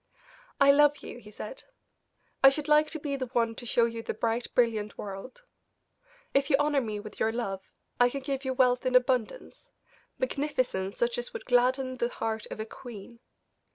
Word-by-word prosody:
"I 275 0 +7
love 295 +1 +4
you," - - -8
he 210 - -14
said. 355 - -8 0.8
"I 270 - +11
should 285 +2 -2
like 300 0 +4
to 315 - -5
be 285 -1 -3
the 260 -2 -3
one 230 -2 0
to 240 +1 -8
show 235 +1 +3
you 230 0 -4
the - - -4
bright, 230 +2 -1
brilliant 220 -4 +1
world. 205 - -8 0.9
If 275 +1 +2
you 280 - +5
honor 290 -1 +2
me 215 -3 -4
with 210 0 -10
your 220 - +2
love, 200 -5 -3 0.4
I 245 0 +6
can 275 +2 -5
give 270 0 -3
you 260 -1 -2
wealth 250 -1 +3
in 255 -1 0
abundance, 255 - 0 0.5
magnificence, 255 - -1
such 235 0 0
as 245 - -7
would - - -7
gladden 255 +1 +2
the 235 0 0
heart 220 -2 -3
of - - -7
a 220 - -3
queen. 230 0 -11
245 Hz, 190 wpm, -28 LUFS, 225-275 Hz, 0.9 s, I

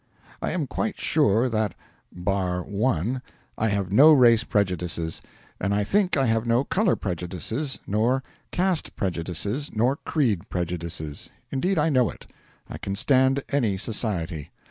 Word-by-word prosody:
I - - -1
am - - -1
quite - - -3
sure 110 +5 +3
that 110 -5 -1 0.4
(bar 90 -1 -1
one) 105 +3 -1 0.3
I 110 - 0
have 100 -2 -1
no 145 +10 +8
race 120 -5 +6
prejudices, 90 -6 -1 0.4
and 100 +2 0
I 105 - +2
think 190 - +2
I 135 - +3
have 115 -1 +1
no 120 +3 +3
colour 195 +5 +2
prejudices 95 - -3
nor 120 +6 +1 0.3
caste 180 -3 0
prejudices 95 - -2
nor 125 +6 +2
creed 115 - 0
prejudices. 85 -4 -4 0.2
Indeed, 180 +8 0
I 155 +1 +3
know 130 -6 +3
it. - - -11 0.4
I - - -8
can 95 - -3
stand 130 +4 +3
any 115 -9 +1
society. 95 - -2
110 Hz, 145 wpm, -25 LUFS, 90-130 Hz, 0.4 s, no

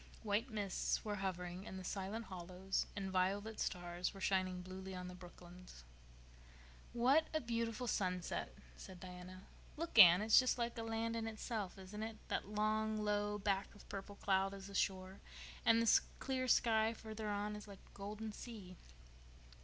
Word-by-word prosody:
White 215 +4 0
mists 205 -2 -1
were 210 -1 -2
hovering 180 -1 -3
in 190 - -7
the 190 - -6
silent 200 +5 -3
hollows 185 +1 -3
and 195 -2 -3
violet 200 +4 0
stars 175 +2 -2
were - - -8
shining 185 -2 0
bluely 190 +1 -7
on 180 0 -5
the 180 - -7
brooklands. 180 - -12 1.1
"What 265 +7 +4
a - - +4
beautiful 230 -1 -2
sunset," 180 - -1 0.2
said 180 - -10
Diana. 185 +1 -9 0.3
"Look, 335 +2 +1
Anne, 175 +3 +10
it's 220 0 +8
just 255 -1 +2
like 235 -1 -1
a 230 - -4
land 225 0 -1
in 225 -1 -2
itself, 215 -3 -4
isn't 195 +3 -7
it? 220 0 -4
That - - -1
long, 215 +1 +1
low 210 0 0
back 200 -1 -1
of 205 - -15
purple 200 +1 -6
cloud 195 0 +1
is 195 -1 -9
the 200 - -9
shore, 190 -1 -1 0.5
and 230 0 +7
the 230 -1 +6 0.2
clear 260 -1 -1
sky 225 -2 +4
further 220 -1 -5
on 205 +1 -1
is 210 0 -8
like 200 -2 -12
a - - -21
golden 210 +2 -5
sea." 205 -5 -9
205 Hz, 170 wpm, -39 LUFS, 185-220 Hz, 1.1 s, Anne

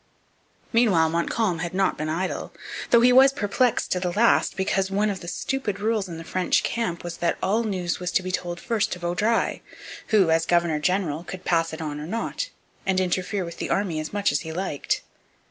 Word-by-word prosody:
Meanwhile 190 -9 +4
Montcalm 170 +2 0
had 175 +2 -4
not 195 0 +2
been 155 +1 -3
idle; 180 +4 -2 0.4
though 235 - +6
he 250 +1 +6
was 265 +2 +8
perplexed 235 +1 0
to 180 - +1
the 180 -1 -1
last, 225 +6 +3
because 190 0 0
one 205 +2 +1
of 190 - -5
the 170 - -10
stupid 210 -1 -2
rules 215 -2 0
in 165 - -6
the 165 - -7
French 185 +2 +1
camp 220 -8 -2
was 175 -1 -5
that 170 - 0
all 215 +5 +2
news 185 -6 -2
was 180 0 -3
to 185 - +2
be 185 - -3
told 175 -2 -3
first 220 0 0
to 175 - -7
Vaudreuil, 180 +7 0 0.5
who, 195 -6 +4
as 165 0 +2
governor 170 -3 +2
general, 170 -2 0
could 185 0 -8
pass 165 -1 +2
it 160 0 -5
on 150 -1 -4
or 150 - -6
not, 230 - -3 0.3
and 190 -1 +1
interfere 185 +1 -1
with 170 - -8
the - - -4
army 185 -6 0
as 155 - -5
much 205 0 +1
as 145 - +1
he 160 - -6
liked. 170 -4 -2
185 Hz, 210 wpm, -25 LUFS, 170-205 Hz, 0.5 s, was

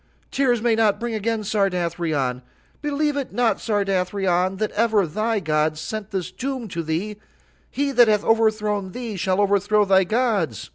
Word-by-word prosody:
"Tears 245 -5 +1
may 235 -1 +3
not 220 -2 +2
bring 235 0 -3
again 220 0 -1
Sardathrion. 170 - -1 0.4
"Believe 295 0 0
it 280 -2 -3
not, 240 -2 +1
Sardathrion, 190 -3 0
that 215 +1 -1
ever 215 -3 +2
thy 215 +7 -1
gods 155 -2 0
sent 215 +5 -5
this 190 -3 -4
doom 255 +3 -4
to 170 -2 -3
thee; 170 +7 -3 0.5
he 280 0 -1
that 245 -3 +5
hath 210 -1 +2
overthrown 215 -4 +1
thee 235 -4 -5
shall 185 +1 0
overthrow 205 +1 +2
thy 190 -1 +4
gods. 205 - -1
205 Hz, 155 wpm, -22 LUFS, 185-225 Hz, 0.5 s, that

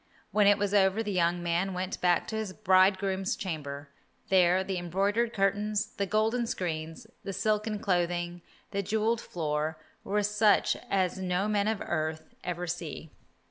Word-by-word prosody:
When 210 -1 +4
it 205 0 +6
was 205 -1 -1
over 200 +2 +3
the 210 - -3
young 175 -1 +1
man 175 +3 0
went 185 +1 -4
back 175 -2 +2
to 220 - -4
his 215 -3 -3
bridegroom's 190 -1 +2
chamber. 145 -5 -5 0.4
There 185 0 +4
the 190 -1 -3
embroidered 200 +7 0
curtains, 205 +1 0
the 200 - 0
golden 220 +4 +1
screens, 165 +1 -4 0.2
the 195 - -4
silken 215 +3 0
clothing, 175 -3 -1 0.3
the 200 -1 -1
jewelled 220 +3 0
floor, 155 -1 -2 0.3
were 205 +1 0
such 210 +1 +3
as 190 -1 +1
no 185 +2 0
men 210 -1 +1
of 220 -2 -1
earth 155 -1 -3
ever 180 0 -3
see. 165 -2 -5
190 Hz, 155 wpm, -29 LUFS, 175-210 Hz, 0.4 s, it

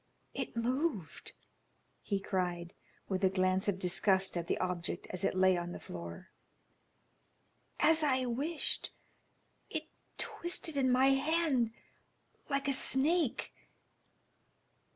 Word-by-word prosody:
"It - - -4
moved," 245 - -2 0.7
he 200 -2 -1
cried, 175 -3 -2 0.3
with 190 0 -2
a 190 - +5
glance 185 0 +1
of 200 -2 +1
disgust 190 +1 +1
at 170 -1 -3
the - - 0
object 180 -1 -3
as 185 +1 -1
it 195 - +1
lay 185 0 +5
on 175 0 -4
the - - -7
floor. 85 -1 -9 1.5
"As 320 +1 +5
I 260 -4 +2
wished, 285 +7 -1 0.8
it - - -3 0.3
twisted 345 -2 -1
in 260 -2 +2
my 260 +2 +5
hand 275 -3 +2 0.8
like 275 -1 -1
a 275 - +3
snake." 280 +2 +3
220 Hz, 115 wpm, -33 LUFS, 185-275 Hz, 1.5 s, a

